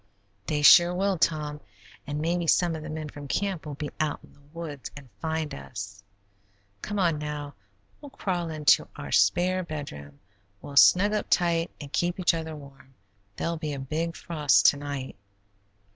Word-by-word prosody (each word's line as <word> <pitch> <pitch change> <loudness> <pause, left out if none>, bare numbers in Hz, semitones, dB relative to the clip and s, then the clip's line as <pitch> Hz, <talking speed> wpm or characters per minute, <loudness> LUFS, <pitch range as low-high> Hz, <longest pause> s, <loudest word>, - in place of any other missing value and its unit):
"They 150 -1 -1
sure 175 +3 +8
will, 195 -1 0
Tom, 150 -2 0 0.5
and 145 +1 -3
maybe 170 +2 -1
some 170 0 +3
of 155 - -6
the 155 - -7
men 155 0 -5
from 145 -1 -9
camp 190 0 -2
will 145 - -5
be 145 +1 -5
out 155 -1 -1
in - - -18
the - - -24
woods 155 -5 -7
and 135 -4 -12
find 160 -1 -2
us. 100 +9 -8 0.8
Come 205 - -4
on 170 -6 +2
now. 150 -1 -5 0.5
We'll 290 - -10
crawl 180 -9 -3
into 155 -2 +3
our 70 - -7
spare 175 - +3
bedroom; 105 - -8 0.4
we'll 140 - -10
snug 200 +8 +6
up 210 - -1
tight 170 -1 +2
and 145 -1 -10
keep 175 +1 0
each 180 - +3
other 160 -1 -4
warm. 135 -2 -14 0.4
There'll 170 +7 -2
be 155 -2 -4
a 140 - -5
big 160 +5 -3
frost 150 -4 +2
to 145 - -9
night." 140 -5 -6
155 Hz, 175 wpm, -27 LUFS, 145-170 Hz, 0.8 s, sure